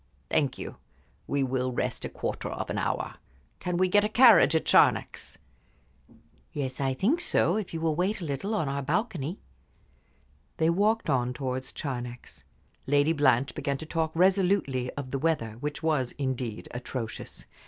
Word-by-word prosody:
"Thank 140 -4 +1
you. - - -7 0.5
We 140 -1 +1
will 130 -1 -1
rest 120 - -2
a - - -3
quarter - - -4
of - - -4
an - - -1
hour. - - -2 0.4
Can 180 -1 -2
we 185 +1 +3
get 205 +3 +4
a 210 - +1
carriage 220 - +7
at 160 - +1
Charnex?" - - +3 1.1
"Yes, 135 -3 -4
I 135 -1 0
think 265 - +1
so, 185 - +2
if 215 -3 -3
you 165 - -4
will 160 -2 +1
wait 190 +6 0
a 175 - -5
little 155 +9 -2
on 160 -8 0
our 140 +1 -2
balcony." 170 - -2 1.2
They 160 +1 +3
walked 215 +5 +1
on 125 -4 +1
towards 130 -1 -4
Charnex. 125 -3 -6 0.4
Lady 145 +3 +3
Blanche 135 -3 +3
began 140 -1 -2
to 160 - -8
talk 160 0 -1
resolutely 180 -8 +2
of 135 -3 -6
the 135 - -1
weather, 130 -8 -1
which 150 +3 -4
was, 150 -6 +1
indeed, 130 -5 -3
atrocious. 125 -2 -6
145 Hz, 165 wpm, -28 LUFS, 130-180 Hz, 1.2 s, carriage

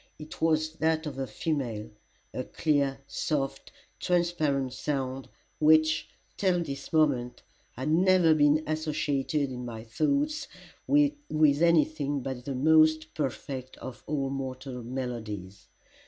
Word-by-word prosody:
It 155 0 -10
was 155 -1 +2
that 160 0 +1
of 140 -3 -5
a 135 - -2
female, 120 -3 -3 0.4
a 130 - -3
clear, 140 -2 0
soft, 135 -2 -3 0.3
transparent 155 -7 0
sound, 135 -1 -3 0.3
which, 155 0 +4 0.3
till 180 -3 +2
this 140 -3 -7
moment, 140 -6 +1 0.3
had 130 +4 -3
never 180 -1 +5
been 150 0 +4
associated 150 -2 -1
in 125 -1 -6
my 115 -2 -6
thoughts 290 - 0 0.4
with 285 - +3
any 170 -2 +5
thing 145 -3 -3
but 130 -1 -5
the 140 - -3
most 155 +3 +4
perfect 130 -1 -4
of 120 -4 -8
all 140 -2 -1
mortal 130 -1 -5
melodies. 115 -6 -6
145 Hz, 125 wpm, -28 LUFS, 130-155 Hz, 0.4 s, never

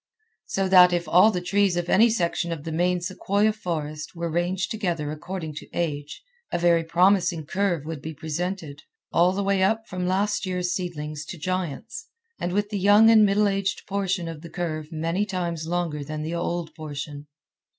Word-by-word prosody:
So 195 0 0
that 180 -1 +8
if 175 -2 -1
all 180 +7 +6
the 185 -5 -1
trees 195 0 +2
of 175 0 -1
any 220 +6 +5
section 170 -4 0
of 160 -3 -4
the 160 - -5
main 175 +2 +1
sequoia 200 +3 +1
forest 155 -6 -5
were 170 -1 -3
ranged 175 +3 -1
together 175 -9 -2
according 160 +1 -5
to - - -9
age, 150 - -3 0.3
a - - 0
very 170 -1 +3
promising 175 -1 +2
curve 180 -4 -1
would 160 -3 -5
be 160 +1 -6
presented, 160 -1 -4 0.3
all 175 +2 +4
the 200 +2 -2
way 195 -1 +1
up 220 +4 +1
from 180 0 -3
last 200 +3 0
year's 180 -1 -1
seedlings 155 -5 -4
to 175 - -7
giants, 185 - -4 0.3
and 175 - -2
with 205 +2 -1
the 205 - -1
young 205 +3 +6
and 215 -2 +7
middle 205 +1 +3
aged 195 -1 -1
portion 195 -3 -1
of 165 -2 -7
the 170 - -9
curve 155 -3 -4
many 165 +5 -1
times 175 -5 -3
longer 165 -4 -2
than 155 +1 -5
the 160 +2 -4
old 170 -1 -3
portion. 145 -1 -7
175 Hz, 185 wpm, -25 LUFS, 160-195 Hz, 0.3 s, that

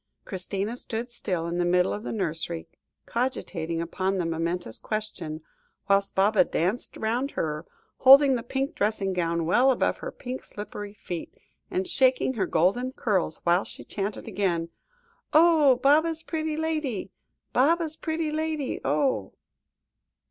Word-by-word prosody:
Christina 195 +4 -3
stood 235 0 -4
still 180 -8 -2
in 170 +1 -2
the - - +3
middle 180 +1 +2
of 210 - -4
the - - -5
nursery, 165 -4 -3 0.4
cogitating 175 -9 -2
upon 190 +3 -1
the 175 - 0
momentous 165 -5 -2
question, 180 -8 -4 0.5
whilst 200 0 +2
Baba 200 +2 +4
danced 185 +9 -2
round 240 +5 0
her, 155 +1 -2 0.3
holding 270 +1 +8
the 245 - 0
pink 270 +6 -2
dressing 205 - 0
gown 170 -2 0
well 245 +11 +4
above 260 - +1
her - - -5
pink 255 0 -6
slippered 205 0 -7
feet, 190 - -7 0.3
and 370 0 -1
shaking 260 -5 +3
her 195 -7 -1
golden 220 +12 +1
curls 190 -10 0
whilst 175 +3 +2
she - - -10
chanted 200 0 -4
again 170 -4 -1 0.6
"Oh! 310 -4 +6
Baba's 310 +5 +3
pretty 315 -1 -2
lady; 305 -12 -2 0.4
Baba's 320 +4 +3
pretty 320 -1 -2
lady, 310 -3 -2
oh!" 275 -3 0
215 Hz, 140 wpm, -26 LUFS, 180-275 Hz, 0.6 s, holding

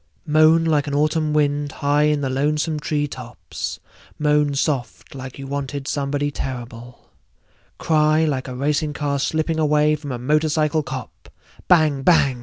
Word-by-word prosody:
Moan 155 +1 +4
like 150 -2 +1
an 145 - -2
autumn 155 +1 +1
wind 145 -1 0
high 145 0 +1
in 150 -1 +1
the 135 - -1
lonesome 150 +3 0
tree 150 0 -1
tops, 125 -4 -7 0.4
moan 150 -1 +2
soft 135 -3 -2
like 130 -1 -8
you 135 - -7
wanted 140 0 -4
somebody 145 0 -1
terrible, 120 -3 -7 0.7
cry 155 0 +2
like 135 -4 -2
a 130 - -6
racing 150 +3 -1
car 145 -1 -2
slipping 160 +2 -1
away 150 0 +3
from 145 -2 -7
a 125 - -3
motorcycle 155 +3 +1
cop, 135 -4 -8 0.4
bang 155 -6 +4
bang! 135 -5 +3
145 Hz, 150 wpm, -21 LUFS, 140-155 Hz, 0.7 s, Moan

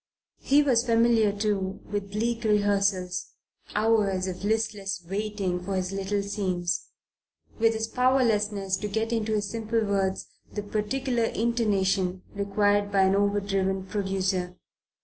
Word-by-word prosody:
He 290 +2 +4
was 245 -5 +3
familiar, 230 -2 +4
too, 200 -2 -1
with 205 -1 -4
bleak 230 +3 -1
rehearsals, 200 -3 +1 0.4
hours 210 -4 +2
of 185 0 -5
listless 205 -2 -1
waiting 195 -2 -2
for 195 +1 -3
his 185 0 -1
little 195 +1 -1
scenes; 180 -4 -2 0.7
with 225 0 +3
his 220 0 -1
powerlessness 215 -6 +1
to 210 - -4
get 220 +3 -1
into 220 -1 0
his 205 -1 0
simple 225 +2 -1
words 195 -2 0 0.3
the 210 - -4
particular 235 +4 -1
intonation 195 -6 0
required 205 0 +1
by 195 -1 +4
an 190 +1 +3
overdriven 195 -1 0
producer. 190 -2 -2
205 Hz, 130 wpm, -27 LUFS, 195-220 Hz, 0.7 s, He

